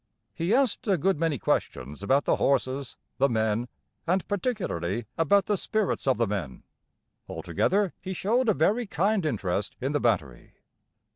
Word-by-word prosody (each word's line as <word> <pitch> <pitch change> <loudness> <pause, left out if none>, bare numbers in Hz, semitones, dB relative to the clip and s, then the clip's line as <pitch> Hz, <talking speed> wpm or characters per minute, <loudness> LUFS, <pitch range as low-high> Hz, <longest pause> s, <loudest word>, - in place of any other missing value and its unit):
He 170 +3 -2
asked 250 -2 +2
a 195 -3 +3
good 190 +1 +1
many 165 -3 +1
questions 75 - -2
about 135 +8 +2
the - - +2
horses, 135 -1 0 0.2
the 140 +1 +4
men, 110 0 0 0.4
and 185 +2 +1
particularly 145 - -2
about 195 +5 +3
the 210 - +1
spirits 215 -6 -1
of 130 - +3
the 115 - +2
men. 95 - -4 0.7
Altogether 200 -1 0
he 190 0 -5
showed 230 +6 +1
a - - +3
very 205 - +1
kind 195 +3 +1
interest 100 -5 -2
in 135 +3 -2
the 145 - +1
battery. 75 - -1
145 Hz, 155 wpm, -27 LUFS, -, 0.7 s, the